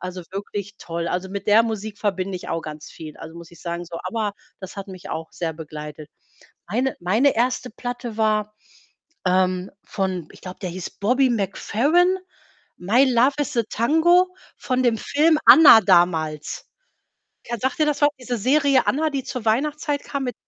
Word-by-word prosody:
Also, 185 0 -6
wirklich 200 +1 -6
toll. 170 0 -4
Also, 180 +1 -3
mit 200 +1 -6
der 215 +2 +6
Musik 220 -2 -5
verbinde 190 -2 -2
ich 180 - -9
auch 165 - -2
ganz 150 -1 -8
viel, 155 -2 -10
also, 165 +1 -10
muss 170 -1 -11
ich 170 -2 -16
sagen. 170 0 -4
So, 170 0 -7
ABBA, 210 +2 -2 0.3
das 190 +1 -9
hat 195 0 -6
mich 185 -2 -9
auch 160 0 -5
sehr 165 -2 -3
begleitet. 150 -1 -9 0.6
Meine 250 +6 0
meine 220 +11 +2
1. 250 +2 0
Platte 245 0 -6
war, 215 -1 0 0.7
ähm, 185 0 +1
von 190 -4 -3
ich - - -17
glaube, 185 0 -8
der 185 - -2
hieß 180 +1 -6
Bobby 255 +5 +3
McFerrin, 275 - +1 0.6
„My 220 +9 +3
love 250 +3 +4
is 290 -2 -2
a 235 - +3
tango“, 325 +9 +3 0.3
von 255 -1 -1
dem 230 -2 +2
Film 310 +6 +2
„Anna“ 300 -8 +10
damals. 165 -5 +1 0.8
Ken 235 -2 -5
sagt 260 +1 -1
dir 305 - +4
das 295 -1 -1
was? 290 - +7
Diese 245 -1 -3
Serie 275 +4 +3
„Anna“, 310 +3 +1
die 275 -2 -2
zur 250 -3 -6
Weihnachtszeit 290 +5 0
kam 280 -2 -4
mit 250 - -3
210 Hz, 175 wpm, -22 LUFS, 180-260 Hz, 0.8 s, Anna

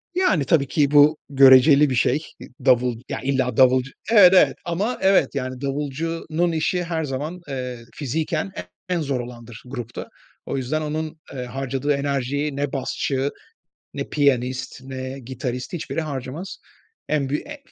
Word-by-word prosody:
Yani, 190 - +2
tabii 140 0 +3
ki, 145 +1 +1
bu 150 +1 +6
göreceli 135 +1 +7
bir 130 - -1
şey. 140 +6 +1 0.4
Davul, 125 -1 +4
ya - - -3
illa 130 -3 0
davulcu 130 0 +4 0.2
Evet, 190 -5 +8
evet. 185 - +5
Ama, 195 +8 -1
evet, 190 -5 +3
yani, 130 -1 -4
davulcunun 155 +4 -2
işi 165 +3 0
her 165 -2 -2
zaman, 150 +6 -4
eee, 125 -3 -5 0.2
fiziken 145 -8 -2 0.4
en 175 -2 0
zor 140 -4 -1
olandır, 120 -2 -9
grupta. 120 -2 -7 0.4
O - - -3
yüzden 135 +4 -1
onun, 155 +1 -4
eee, 125 -2 -5
harcadığı 135 +2 -2
enerjiyi 140 +1 -1
ne 145 -1 -2
basçı, 135 0 -1 0.6
ne - - -5
piyanist, 130 -2 0
ne 130 0 -6
gitarist, 125 +3 -5
hiçbiri 165 -1 -3
harcamaz. 150 - -6 0.5
En 145 -3 0
büy 150 - -1
en 295 0 -8
140 Hz, 145 wpm, -22 LUFS, 130-155 Hz, 0.6 s, Evet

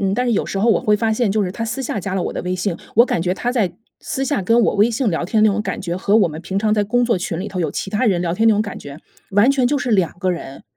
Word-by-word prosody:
嗯， 195 0 0
但 250 - 0
是 240 - +1
有 - - 0
时 195 - -3
候 230 +3 +3
我 - - +3
会 210 0 +2
发 225 0 0
现， 220 -2 +1
就 210 -1 +1
是 180 - -4
他 230 - -5
私 235 +4 -4
下 220 - -3
加 190 +1 -4
了 185 - 0
我 - - -3
的 - - -4
微信， 180 0 -2 0.2
我 235 +3 +7
感 175 - -1
觉 180 +2 0
他 245 +5 -2
在 210 -8 +1 0.3
私 270 - -3
下 285 -6 0
跟 230 +5 +2
我 - - +2
微信 225 +2 +2
聊 165 - -1
天 215 +4 +1
那 215 - +5
种 205 +1 -1
感 - - -4
觉， 175 -2 -3
和 200 +3 +2
我 200 -6 +4
们 155 +1 -7
平 190 +3 -3
常 215 0 +1
在 210 -1 +2
工 245 +4 +1
作 230 -6 +1
群 170 -2 -4
里 195 - -4
头 185 - -4
有 155 -4 -1
其 195 - -4
他 215 +4 0
人 180 -4 +2
聊 170 -1 -1
天 225 +5 +3
那 - - +6
种 210 - +1
感 205 - -7
觉， 145 +1 -10 0.3
完 205 +6 +4
全 265 -3 +2
就 290 - +1
是 250 -3 -2
两 185 -4 +1
个 185 -1 0
人。 135 -6 -6
205 Hz, 370 characters per minute, -19 LUFS, 185-230 Hz, 0.3 s, 我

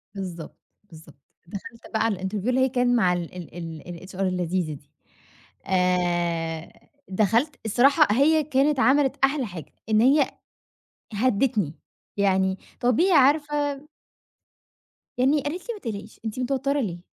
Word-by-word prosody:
بالضبط، 175 -4 -7 0.3
بالضبط، 160 -7 -16 0.3
دخلت 230 +6 -9
بقى 220 0 +1
على 225 -3 +1
ال 190 - -2
interview 210 +1 -4
اللي 255 +1 +2
هي 260 - +3
كان 245 -1 +2
مع 185 -6 +3
ال 175 0 -5
ال 175 -1 -9 0.4
ال 175 +2 -11
الHR - - -11
اللذيذة 180 -3 -1
دي 145 0 -14 0.7
آآ، 175 -3 -1 0.2
دخلت 225 +9 +1
الصراحة 275 +7 +4
هي 310 +3 +4
كانت 280 0 +1
عملت 270 +3 +3
أحلى 270 -1 +2
حاجة، 180 -6 -9 0.2
إن 215 0 +4
هي 275 +2 +4 0.8
هدتني 210 - +1 0.4
يعني 190 -1 +1 0.2
طبيعي 250 - +3
عارفة 290 0 +2 1.3
يعني 275 +4 +3
قالت 335 - -5
لي: 475 - 0
"ما 420 - -10
تقلقيش، 215 - -7
أنتِ 220 +3 -4
متوترة 275 +2 0
ليه؟ 175 -6 -4
225 Hz, 135 wpm, -25 LUFS, 185-275 Hz, 1.3 s, الصراحة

